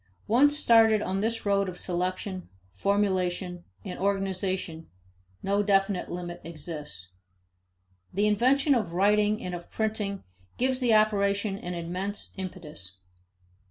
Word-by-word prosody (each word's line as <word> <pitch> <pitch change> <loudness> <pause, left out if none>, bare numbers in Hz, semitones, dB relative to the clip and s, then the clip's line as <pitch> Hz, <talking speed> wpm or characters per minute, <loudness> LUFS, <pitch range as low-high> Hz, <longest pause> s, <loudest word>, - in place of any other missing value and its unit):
Once 285 +7 +4
started 225 -5 +5
on 190 -1 -2
this 225 +2 -1
road 200 -1 +2
of 180 - -8
selection, 185 +1 -3 0.2
formulation, 180 - 0 0.2
and - - -6
organization, 190 -4 -1 0.5
no 200 +1 +2
definite 195 -2 +1
limit 175 -1 -5
exists. 150 - -8 1.0
The 205 +3 +1
invention 260 +7 +3
of 215 -9 0
writing 210 +3 +3
and 180 - -4
of 175 -1 -7
printing 210 -3 -2 0.3
gives 255 0 +1
the 240 -4 +4
operation 200 -1 +2
an 180 0 -5
immense 185 +4 -4
impetus. 155 - -7
195 Hz, 120 wpm, -28 LUFS, 180-210 Hz, 1.0 s, started